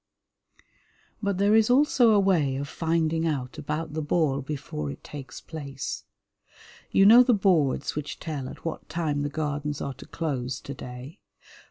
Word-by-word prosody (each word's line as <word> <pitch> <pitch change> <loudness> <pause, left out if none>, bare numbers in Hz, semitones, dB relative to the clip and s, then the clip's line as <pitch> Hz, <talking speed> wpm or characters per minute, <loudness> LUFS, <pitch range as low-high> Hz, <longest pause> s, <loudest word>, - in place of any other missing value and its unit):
But 200 -3 0
there 200 +2 +3
is 220 0 +5
also 255 -2 +5
a 210 -2 +5
way 170 -9 +2
of 140 +1 -3
finding 165 +1 0
out 130 -5 -3
about 150 +1 -3
the 155 - -2
ball 145 -2 +1
before 135 - -5
it 70 - -8
takes 135 -4 -8
place. 140 -4 -6 0.8
You 195 - +4
know 230 +4 +9
the 250 -2 +4
boards 165 -9 +2
which 150 -1 -5
tell 145 -5 -4
at - - -12
what 165 - -5
time 155 -4 -1
the 145 - -1
Gardens 145 -1 -3
are 140 - -3
to - - -13
close 130 -6 -3
to 140 - -7
day. 125 +3 -9
150 Hz, 165 wpm, -26 LUFS, 140-175 Hz, 0.8 s, know